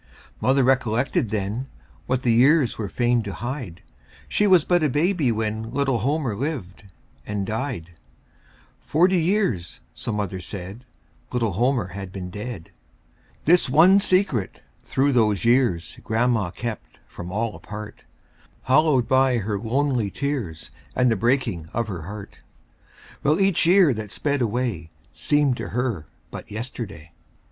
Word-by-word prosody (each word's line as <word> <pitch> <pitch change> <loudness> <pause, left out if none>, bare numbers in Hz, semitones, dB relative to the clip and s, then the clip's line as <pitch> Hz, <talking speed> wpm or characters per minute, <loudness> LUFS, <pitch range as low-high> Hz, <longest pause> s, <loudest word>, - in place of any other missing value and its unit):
Mother 135 +1 +3
recollected 125 -2 +1
then 110 +5 -2 0.4
What 130 0 0
the 120 - +3
years 135 +3 +4
were 105 -3 -4
fain 120 +1 +1
to 100 -3 -6
hide 120 - -6 0.4
She 210 - +2
was 185 -5 +5
but 175 -1 +3
a 155 - +2
baby 150 -1 +1
when 110 0 -2
Little 135 -3 +1
Homer 135 -1 0
lived 115 - -4 0.4
and 105 -1 -2
died; 110 - -4 0.9
Forty 180 +3 +2
years, 160 - 0
so - - -5
mother 100 -3 -3
said, 95 +6 -8 0.5
Little 115 -4 0
Homer 120 0 +1
had 95 0 -7
been 90 -2 -6
dead. 105 -3 -7 0.7
This 170 -3 +4
one 175 +8 +6
secret 185 - +1 0.2
through 140 +2 +1
those 110 -7 +2
years 115 -10 +2
Grandma 110 -4 +1
kept 110 +5 -6
from 85 +1 -8
all 110 +2 -2
apart, 105 0 -9 0.6
Hallowed 135 -2 +3
by 130 -1 +3
her 105 -2 -2
lonely 125 -1 0
tears 120 - -4 0.2
And 125 -1 +3
the - - +2
breaking 115 - 0
of 115 -1 0
her 90 -5 -5
heart; 100 0 -9 0.8
While 150 +5 +2
each 195 -4 +3
year 180 -5 +6
that 110 -2 -6
sped 145 +5 -1
away 115 -8 -1 0.2
Seemed 145 -4 +1
to - - -5
her 115 - -2 0.2
but - - -8
yesterday. 105 -7 -7
120 Hz, 140 wpm, -23 LUFS, 105-140 Hz, 0.9 s, one